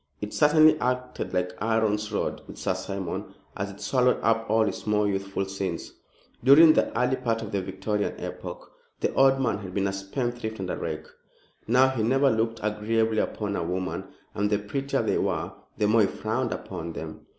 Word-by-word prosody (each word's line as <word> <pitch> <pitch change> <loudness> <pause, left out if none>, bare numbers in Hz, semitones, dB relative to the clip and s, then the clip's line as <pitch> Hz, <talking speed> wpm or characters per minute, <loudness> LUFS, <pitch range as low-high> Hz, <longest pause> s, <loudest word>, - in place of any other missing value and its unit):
It 105 0 -5
certainly 155 +1 +5
acted 125 0 -2
like 90 0 -1
Aaron's 105 -1 +1
rod - - -2
with - - -10
Sir - - 0
Simon, 95 -3 -5 0.2
as 100 0 -3
it 100 - -11
swallowed 125 -1 +2
up 115 0 +1
all 110 +1 +4
his 100 0 -4
more 105 -1 +2
youthful 95 0 -2
sins. 95 -3 -4 0.5
During 155 +5 +8
the - - +2
early 125 +1 +2
part 115 -3 -1
of 105 - -7
the 100 - 0
Victorian 95 +3 -2
epoch, - - -7 0.3
the - - 0
old 135 0 +5
man 125 -6 0
had 95 -3 -8
been 100 -1 +1
a 100 - 0
spendthrift 110 +2 -3
and 95 -1 -3
a - - -1
rake. 80 -1 -4 0.6
Now, 130 +3 +5
he 130 -4 -2
never 135 +4 +3
looked 115 0 0
agreeably 110 +1 +1
upon 105 -2 -2
a - - -1
woman, 90 +2 -3 0.3
and 105 0 0
the 105 - +2
prettier 135 +7 -2
they - - +1
were - - -1 0.3
the 105 - +2
more 110 +1 +4
he 100 - +4
frowned - - -2
upon 85 0 -5
them. 80 0 -8
105 Hz, 190 wpm, -26 LUFS, 100-125 Hz, 0.6 s, During